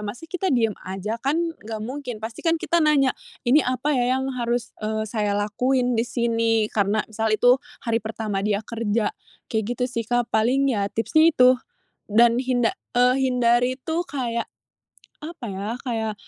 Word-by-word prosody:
masa 235 +10 -7
kita 370 +1 -1
diem 225 -4 +2
aja 195 +4 -4
kan 275 +3 +1 0.3
enggak 220 -1 -5
mungkin 255 0 -5
pasti 220 +1 -7
kan 330 0 +2
kita 340 - +1
nanya 280 -4 +3 0.3
ini 285 +5 +6
apa 255 +3 -1
ya 250 0 +2
yang 265 0 -2
harus, 240 -1 -2
eee, 215 0 -1
saya 210 -3 0
lakuin 250 +4 +1
di 230 - +2
sini 230 -2 +1
karena 205 +1 +1
misal 220 +1 -1
itu 245 +3 +5 0.3
hari 230 -1 +1
pertama 215 -2 -3
dia 205 -1 +1
kerja 225 -1 -1 0.4
kayak 220 -1 0
gitu 250 - 0
sih 230 -2 -3
Kak, 240 -1 0
paling 260 +5 +3
ya 205 -5 0
tipsnya 315 +9 +4
itu, 255 -1 +6 0.5
dan 235 +2 +5
hinda 245 -3 +1 0.2
eee, 250 +1 +5 0.2
hindari 245 0 +2
itu 330 +4 -1
kayak, 240 -6 -2 0.8
apa 320 -5 -7
ya 195 +2 -4 0.2
kayak 220 -3 -2
235 Hz, 165 wpm, -23 LUFS, 220-255 Hz, 0.8 s, ini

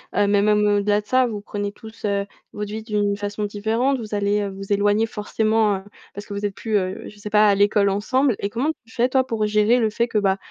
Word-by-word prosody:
heu, 205 - +3
mais 200 0 +3
même 210 0 +3
au-delà 205 0 +2
de - - -28
ça 255 +2 +3
vous 210 -3 -5
prenez 205 0 -4
tous, 220 +1 -10
heu, 200 -1 0 0.3
votre 210 0 -5
vie 220 +1 -4
d'une 205 -2 0
façon 205 +1 -4
différente. 220 +6 0
Vous 215 -2 -5
allez, 205 0 +1
heu, 205 -1 -2
vous 195 +1 -8
éloigner 205 +2 +3
forcément, 215 0 0
heu, - - -14 0.3
parce 205 +1 -8
que 205 - -8
vous 200 +1 -3
êtes 200 -1 -3
plus, 220 -2 -1
heu, 185 -1 -3
je 210 - -16
sais 210 - -6
pas, 210 0 +5
à 200 - +4
l'école 205 0 +3
ensemble, 235 +5 +1
et 200 - -2
comment 245 +8 -1 0.2
tu 225 - -18
fais, 245 +2 +1
toi, 260 0 +2
pour 225 -3 -1
gérer 210 +3 +3
le 220 -2 +2
fait 235 +3 0
que 220 - 0
bah, 195 -1 +1
210 Hz, 255 wpm, -22 LUFS, 205-220 Hz, 0.3 s, pas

